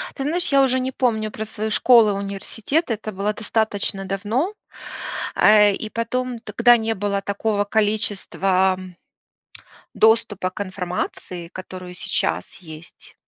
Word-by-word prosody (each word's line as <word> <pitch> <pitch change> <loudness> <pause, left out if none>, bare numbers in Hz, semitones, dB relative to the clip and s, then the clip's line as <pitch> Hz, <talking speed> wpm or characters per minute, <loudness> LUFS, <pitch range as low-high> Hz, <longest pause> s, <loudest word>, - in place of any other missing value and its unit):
Ты 270 - -4
знаешь, 340 +4 +1
я 275 -1 +4
уже 260 -1 +2
не 260 +1 -2
помню 220 -4 0
про 220 - -5
свою 215 0 -4
школы, 230 -2 +5
университеты, 210 - -2
это 215 0 -7
было 200 +2 -1
достаточно 210 -3 -1
давно, 220 - -1 0.8
э, 210 -1 +6
и 220 - -5
потом 240 +1 -2
тогда 235 +2 +4
не 225 0 -1
было 200 0 -1
такого 205 +1 -1
количества 195 -3 +1 1.2
доступа 220 -4 +3
к 195 - -10
информации, 180 -2 -5
которую 185 0 -9
сейчас - - -2
есть 160 -2 -13
210 Hz, 125 wpm, -22 LUFS, 195-230 Hz, 1.2 s, э